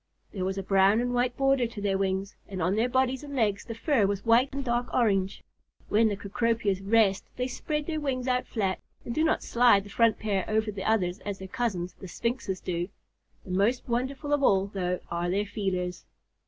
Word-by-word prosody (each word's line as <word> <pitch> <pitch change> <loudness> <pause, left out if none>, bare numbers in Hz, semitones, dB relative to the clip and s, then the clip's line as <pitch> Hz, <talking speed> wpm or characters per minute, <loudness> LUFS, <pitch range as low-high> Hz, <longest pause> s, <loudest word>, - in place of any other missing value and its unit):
There 185 -3 -3
was 190 +1 -2
a 195 - -2
brown 195 +3 +4
and 245 +1 -1
white 245 0 0
border 270 -3 +3
to 225 -2 -9
their 200 -1 0
wings, 195 0 -1
and 190 -2 -6
on 180 +2 +1
their 230 +3 +1
bodies 260 +1 +1
and 285 -1 -7
legs 210 -5 +1
the 230 - -6
fur 230 -4 +2
was 200 +1 -3
white 235 +4 +4
and 275 0 -4
dark 240 0 -1
orange. 195 -6 +1 0.5
When 220 +2 +4
the 205 -2 -1
Cecropias 210 -1 0
rest, 200 -1 +3
they 250 - -1
spread 300 +3 -3
their 310 -1 -2
wings 265 -3 -2
out 250 0 +1
flat, 195 -5 -1 0.3
and 235 - -3
do 310 - +1
not 320 - +2
slide 235 -5 +4
the 200 - -12
front 230 -2 +3
pair 200 -3 -1
over 220 0 +1
the 195 -2 -6
others 185 -5 +1
as 200 -1 -5
their 190 - -8
cousins, 185 -6 -2
the 190 - -10
Sphinxes, 225 0 -2
do. 175 0 -2 0.6
The 185 - -7
most 205 +7 +1
wonderful 260 +4 -1
of 290 - +2
all, 195 -7 +4
though, 180 -2 -1
are 170 +1 -1
their 200 +3 +1
feelers. 185 -4 -3
215 Hz, 210 wpm, -28 LUFS, 195-245 Hz, 0.6 s, brown